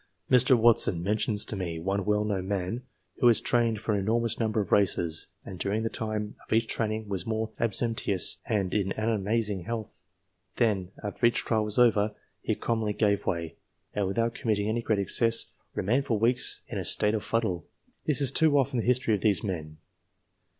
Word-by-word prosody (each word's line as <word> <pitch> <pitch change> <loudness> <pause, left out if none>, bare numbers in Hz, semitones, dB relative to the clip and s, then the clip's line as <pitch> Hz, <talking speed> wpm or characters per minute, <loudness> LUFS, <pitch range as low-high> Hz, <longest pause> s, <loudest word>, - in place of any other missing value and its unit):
Mr. 125 0 +6
Watson 110 -7 +4
mentions 105 +1 0
to - - -5
me 85 -4 -4
one 95 +3 -2
well 105 0 +1
known 95 -3 -2
man, 100 +4 -2 0.4
who 120 - +5
has 115 - +6
trained 115 -3 +1
for 110 - -1
an 100 - +1
enormous 115 +3 0
number 110 -1 0
of 100 - -3
races, 85 -5 +2 0.2
and 95 -2 -8
during 105 +4 -1
the 115 - -2
time 110 -1 -3
of - - -21
each 115 +1 +3
training 110 -1 -2
was 95 -2 -3
most 110 0 -2
abstemious 115 -4 0
and 100 -4 0
in 100 -2 0
amazing 105 -3 -1
health; 115 -2 -5 0.5
then, 100 -6 +1
after 105 +3 +1
each 120 - +1
trial 110 -2 +1
was 105 0 -4
over, 110 -3 +3 0.3
he - - -1
commonly 110 -3 -1
gave 100 -1 +1
way, 85 -2 -2 0.4
and 100 -2 0
without 115 +4 0
committing 105 -3 -1
any 115 +2 0
great 110 -2 0
excess, 115 +3 +2 0.2
remained 125 +8 +1
for 115 - +1
weeks 120 +4 0
in - - -4
a - - -3
state 105 0 +2
of 110 - -2
fuddle. 110 -7 -1 0.4
This 150 -1 +2
is 135 -2 +3
too 150 0 +3
often 135 -2 +1
the - - -2
history 125 -2 +2
of 100 - 0
these 100 -5 +2
men. 80 -6 -5
110 Hz, 190 wpm, -28 LUFS, 100-115 Hz, 0.5 s, Mr